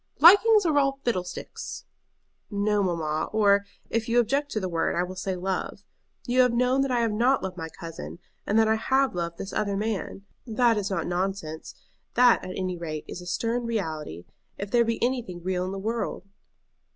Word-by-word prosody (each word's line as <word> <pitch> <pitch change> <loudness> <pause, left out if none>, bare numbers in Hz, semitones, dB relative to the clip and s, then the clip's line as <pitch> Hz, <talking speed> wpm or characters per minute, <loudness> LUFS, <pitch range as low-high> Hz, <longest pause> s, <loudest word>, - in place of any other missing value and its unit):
"Likings 410 +5 +7
are 315 -3 +2
all 275 -1 +1
fiddlesticks!" 185 -7 -4 0.6
"No, 205 0 +1
mamma; 160 -4 -1
or, 200 -2 +4 0.3
if 230 +1 -1
you 235 - +2
object 280 +5 +1
to 215 - 0
the 190 - -2
word, 165 -2 0
I 175 - +1
will 185 +1 -6
say 190 0 -3
love. 190 +2 -3 0.4
You 250 +1 +3
have 250 -2 +3
known 250 +2 +2
that 275 - 0
I 245 -2 +1
have 230 -2 +1
not 245 +5 +2
loved 190 -1 -4
my 160 -3 -6
cousin, 165 0 -8 0.3
and 210 - +2
that 225 -1 +5
I 220 0 +3
have 265 +4 +2
loved 170 -1 -3
this 195 - -6
other 200 -2 0
man. 205 -2 -3 0.2
That 235 0 +3
is 205 -2 -1
not 195 - -1
nonsense; 175 -3 -3 0.4
that 245 -1 +5
at 185 - -6
any 185 -2 -3
rate 155 -3 -5
is 180 - -7
a 175 - -10
stern 230 +6 -1
reality, 155 - -4 0.3
if 200 0 -6
there 240 -1 +5
be 230 0 -1
anything 235 -9 -2
real 180 0 -1
in 185 - -4
the 195 - -4
world." 220 -1 -3
205 Hz, 195 wpm, -26 LUFS, 180-240 Hz, 0.6 s, Likings